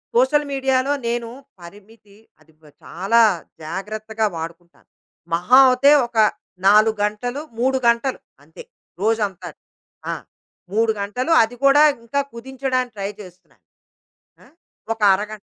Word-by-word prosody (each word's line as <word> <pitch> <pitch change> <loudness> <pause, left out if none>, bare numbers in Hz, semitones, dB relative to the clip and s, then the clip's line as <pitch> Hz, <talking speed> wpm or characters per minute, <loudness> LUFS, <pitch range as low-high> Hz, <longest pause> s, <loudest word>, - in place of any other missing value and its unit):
Social 265 +5 +3
మీడియాలో 265 0 0 0.2
నేను 235 0 -2 0.3
పరిమితి 205 +3 -16 0.2
అది 160 - -25 0.3
చాలా 195 +7 +1 0.4
జాగ్రత్తగా 215 +6 -4
వాడుకుంటాను. 165 +1 -9 0.5
మహా 180 +10 +4
అయితే 265 +3 +4 0.2
ఒక 235 -1 -11 0.5
4 215 +2 +4
గంటలు, 245 +6 -4 0.2
3 265 +2 +1
గంటలు 235 +3 +1 0.2
అంతే, 160 +2 -13 0.4
రోజంతా. 210 -3 -1 0.6
ఆ! - - -1 0.6
3 225 +1 +2
గంటలు 250 +10 -3
అది 225 +2 -5
కూడా 275 +2 +6 0.2
ఇంకా 235 +5 -2
కుదించడానికి 255 0 -3
ట్రై 195 0 -3
చేస్తున్నాను. 180 -2 -17 0.8
ఆహ్, - - -22 0.4
ఒక 225 - -26
అరగంట. 210 +2 -3
225 Hz, 110 wpm, -20 LUFS, 200-255 Hz, 0.8 s, కూడా